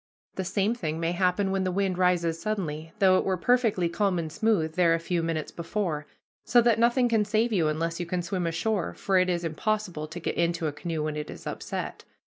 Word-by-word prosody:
The 190 - -3
same 200 +4 +1
thing 160 -9 -3
may 165 0 0
happen 185 +2 +1
when 190 0 0
the 185 - 0
wind 190 0 0
rises 170 -2 +2
suddenly, 165 -7 -3
though 190 -2 +5
it - - -1
were 190 -1 0
perfectly 225 -4 +2
calm 185 +2 0
and 160 -2 -3
smooth 185 -5 +1
there 170 -1 +4
a - - -2
few 170 +1 -1
minutes 165 -2 -2
before; 165 -3 -3 0.4
so 245 - +4
that 235 -1 +3
nothing 240 +2 +4
can 225 -3 +2
save 220 +2 +1
you, 170 -6 +2
unless 165 +2 -1
you 175 - -3
can 175 0 -2
swim 175 0 -2
ashore, 175 +3 -1
for 190 -2 +2
it 185 0 +2
is 175 -1 0
impossible 170 -1 -2
to 165 +3 -7
get 165 - -2
into 170 -1 0
a 155 - 0
canoe 160 0 -3
when 155 0 -2
it 150 0 -5
is - - -9
upset. - - -5
180 Hz, 225 wpm, -27 LUFS, 165-205 Hz, 0.4 s, though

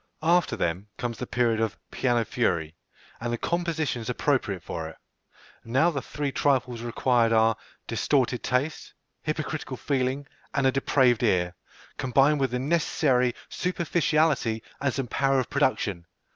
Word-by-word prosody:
After 175 +2 +3
them, 85 +5 -2
comes 120 -1 -4
the 125 - -4
period 115 -2 +1
of 110 -2 -1
"piano 120 -3 +1
fury," 85 -9 0 0.4
and 120 0 -3
the 120 - -1
compositions 160 -8 -1
appropriate 125 - 0
for 80 -1 -5
it. 80 - -12 0.7
Now 135 +9 +3
the 140 -4 -3
three 145 +3 -3
trifles 130 -4 +1
required 120 0 +2
are 115 0 +4 0.3
distorted 130 -4 +1
taste, 135 +5 -2 0.3
hypocritical 155 -3 -3
feeling, 135 +1 -1 0.3
and 140 -2 +2
a 130 - +5
depraved 130 -3 +3
ear, 90 -6 +2 0.4
combined 140 +3 +3
with 135 -1 +1
the 125 - -1
necessary 130 -3 +2
superficiality 160 -9 +1 0.2
and 140 -1 +2
some 135 0 -2
power 135 +3 +1
of 130 - -3
production. 105 - 0
130 Hz, 140 wpm, -26 LUFS, 115-145 Hz, 0.7 s, a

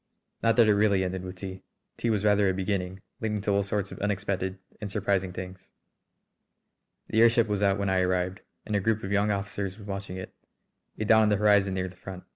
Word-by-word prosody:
Not 115 -1 +3
that 115 -2 +6
it 105 - +5
really 100 -2 +3
ended 95 0 -3
with 90 0 -7
tea. 95 0 -7 0.4
Tea 120 - -1
was 105 -2 +1
rather 105 -1 +4
a 95 - 0
beginning, 95 -1 -2 0.2
leading 110 -3 -1
to 100 - 0
all 100 0 +3
sorts 100 -1 -2
of - - -8
unexpected 100 -2 -2 0.2
and 105 - -4
surprising 100 -2 0
things. 95 +1 -8 1.4
The 110 - +3
airship 115 0 +5
was 105 -1 -1
out 100 -1 +3
when 100 -1 0
I 95 - +2
arrived, 90 +1 0 0.2
and 105 - -2
a - - +3
group 110 +2 0
of 95 - -4
young 100 +1 +2
officers 100 -1 -3
was 105 - -11
watching 95 -2 -5
it, 95 - -8 0.6
a 110 - -2
dot 110 +1 +6
on 110 - +4
the 105 - +3
horizon 100 -2 +3
near 95 0 -1
the 90 - -11
front. 95 -1 -9
100 Hz, 220 wpm, -27 LUFS, 95-105 Hz, 1.4 s, that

